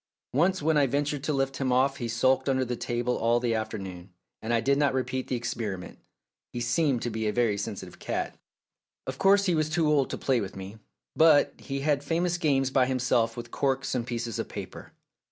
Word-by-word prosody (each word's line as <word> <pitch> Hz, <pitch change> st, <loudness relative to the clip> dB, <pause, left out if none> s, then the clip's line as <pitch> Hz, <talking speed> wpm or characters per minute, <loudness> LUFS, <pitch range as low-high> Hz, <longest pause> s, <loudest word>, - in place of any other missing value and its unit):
Once 175 Hz, +5 st, +2 dB
when 160 Hz, 0 st, +3 dB
I 140 Hz, -2 st, +4 dB
ventured 145 Hz, +1 st, -1 dB
to 155 Hz, -, 0 dB
lift 135 Hz, -1 st, -1 dB
him 130 Hz, -2 st, 0 dB
off 135 Hz, +2 st, +2 dB
he 120 Hz, -, -3 dB
sulked 130 Hz, +4 st, +2 dB
under 130 Hz, -1 st, +1 dB
the 125 Hz, 0 st, -2 dB
table 120 Hz, +1 st, -1 dB
all 115 Hz, +1 st, +3 dB
the 120 Hz, -1 st, 0 dB
afternoon, 95 Hz, -5 st, -5 dB, 0.3 s
and 110 Hz, -, -3 dB
I 115 Hz, -, +3 dB
did 140 Hz, +4 st, +2 dB
not 140 Hz, -3 st, +2 dB
repeat 130 Hz, 0 st, -2 dB
the -, -, -1 dB
experiment. 115 Hz, -7 st, -4 dB, 0.5 s
He 120 Hz, -, -4 dB
seemed 125 Hz, +1 st, +1 dB
to 120 Hz, -, -2 dB
be 110 Hz, 0 st, -2 dB
a -, -, +1 dB
very 115 Hz, -2 st, +1 dB
sensi 100 Hz, -1 st, -4 dB
tive 90 Hz, -, -14 dB
cat. -, -, -3 dB, 0.7 s
Of 130 Hz, 0 st, -5 dB
course 200 Hz, +1 st, +5 dB
he 180 Hz, -, +2 dB
was 155 Hz, -1 st, +1 dB
too 160 Hz, 0 st, +1 dB
old 145 Hz, -3 st, +2 dB
to -, -, -4 dB
play 130 Hz, -4 st, +1 dB
with 95 Hz, -, -6 dB
me, 95 Hz, +3 st, -8 dB, 0.4 s
but 155 Hz, -3 st, +5 dB
he 135 Hz, -1 st, -4 dB
had 145 Hz, -1 st, +1 dB
famous 175 Hz, +3 st, 0 dB
games 135 Hz, -5 st, +2 dB
by 130 Hz, -1 st, +3 dB
himself 125 Hz, -3 st, +1 dB
with 120 Hz, 0 st, -7 dB
corks 135 Hz, -1 st, 0 dB
and 120 Hz, -2 st, -2 dB
pieces 115 Hz, -3 st, -3 dB
of -, -, -3 dB
paper. -, -, -8 dB
130 Hz, 215 wpm, -27 LUFS, 115-145 Hz, 0.7 s, course